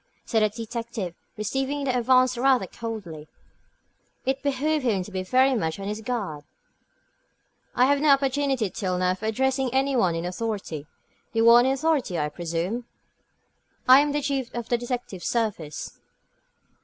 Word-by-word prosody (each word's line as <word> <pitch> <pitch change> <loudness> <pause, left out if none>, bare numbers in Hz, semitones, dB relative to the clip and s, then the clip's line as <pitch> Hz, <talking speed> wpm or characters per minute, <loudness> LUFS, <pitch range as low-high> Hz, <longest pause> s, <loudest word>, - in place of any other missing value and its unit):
said 225 -2 +1
the 215 - +4
detective, 230 -3 -5 0.2
receiving 270 +6 -2
the 260 -2 0
advance 255 +1 +4
rather 255 -3 +3
coldly. 185 -8 -7 1.0
It 265 +1 0
behooved 290 +2 0
him 210 -7 +1
to 205 - -11
be 190 -1 -2
very 255 +8 +3
much 160 -8 -1
on 195 - -5
his 210 +1 -4
guard. 205 -11 -3 1.3
"I 250 - +5
have 285 +1 +3
had - - -5
no 305 - +3
opportunity 275 -5 +2
till 185 -3 -2
now 180 0 +2
of 185 - -5
addressing 260 +4 0
any 270 +1 +1
one 180 -9 +2
in 165 +1 -3
authority. 180 -6 -4 0.5
You 225 0 +3
are 240 - +9
in 245 - +3
authority, 270 - +1
I 150 -1 0
presume?" 175 +8 -3 1.0
"I 260 +1 +9
am 290 0 +2
the 290 0 -1
Chief 270 -3 -2
of 235 -1 -5
the 240 - +2
Detective 240 -6 -5
Service." 205 -10 -3
235 Hz, 160 wpm, -25 LUFS, 190-265 Hz, 1.3 s, are